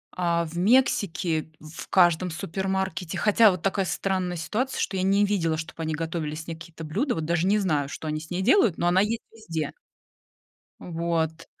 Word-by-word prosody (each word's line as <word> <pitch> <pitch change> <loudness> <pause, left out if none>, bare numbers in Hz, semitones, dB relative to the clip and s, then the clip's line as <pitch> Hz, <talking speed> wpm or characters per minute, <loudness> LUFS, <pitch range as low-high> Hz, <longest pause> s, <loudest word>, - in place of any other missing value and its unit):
а 170 -1 +1
в 165 +2 -8
Мексике- 180 -7 +2
в 155 +1 -10
каждом 175 -1 +4
супермаркете. 190 0 -3
Хотя 215 0 +5
вот 180 -2 -4
такая 195 -1 0
странная 180 0 -1
ситуация, 220 - -2
что 190 - -1
я 185 - 0
не 200 +2 +4
видела, 165 -6 0
чтоб 160 +1 -7
они 160 -1 -2
готовили 160 -1 -3
с 160 +2 -8
ней 165 - -4
какие-то 165 -1 -10
блюда, 225 - -1
вот 160 -2 -3
даже 170 +2 +1
не 210 +1 +3
знаю, 150 -7 0
что 155 - -7
они 155 0 -2
с 160 - -11
ней 180 +1 -2
делают, 230 - +4
но 175 - 0
она 180 +2 +4
есть 225 +2 -1
везде. 165 -9 -4 1.1
Вот. 165 -1 -2
175 Hz, 185 wpm, -26 LUFS, 160-195 Hz, 1.1 s, Хотя